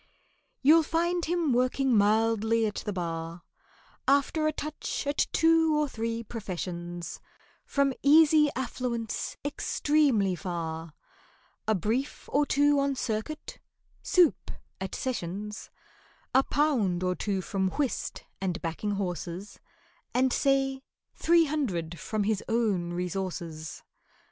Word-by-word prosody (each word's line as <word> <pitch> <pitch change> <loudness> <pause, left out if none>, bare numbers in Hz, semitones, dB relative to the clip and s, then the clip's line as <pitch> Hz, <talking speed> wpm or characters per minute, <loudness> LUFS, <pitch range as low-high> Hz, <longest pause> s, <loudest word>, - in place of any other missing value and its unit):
You'll 315 +4 +7
find 340 +2 0
him 335 -4 +1
working 255 +1 +2
mildly 220 +2 +3
at 210 - -3
the - - 0
Bar, 165 -2 -4 0.6
After 285 +3 +3
a - - +2
touch 305 0 -4
at 285 +1 +1
two 325 -1 +4
or 300 - +1
three 230 -2 -3
professions, 175 -5 -5 0.4
From 280 - +1
easy 305 +1 +6
affluence 245 -3 -3
extremely 285 -8 +2
far, 165 -2 -4 0.7
A 220 - +3
brief 225 - -2
or 290 +1 +2
two 290 0 +4
on 275 0 +1
Circuit—"soup" 305 +7 -1 0.3
at 190 -2 -4
Sessions; 210 -3 -4 0.6
A 265 - +6
pound 240 -13 +1
or 180 0 +1
two 195 +1 -2
from 190 0 -1
whist 280 +4 -2 0.2
and 185 -1 -1
backing 190 +5 -2
horses, 180 0 -4 0.6
And, 255 0 +3
say 270 -1 +1 0.3
three 335 0 +4
hundred 185 - -2
from 215 -2 -2
his 210 -1 0
own 210 -7 +1
resources. 175 -3 -4
225 Hz, 115 wpm, -28 LUFS, 185-285 Hz, 0.7 s, You'll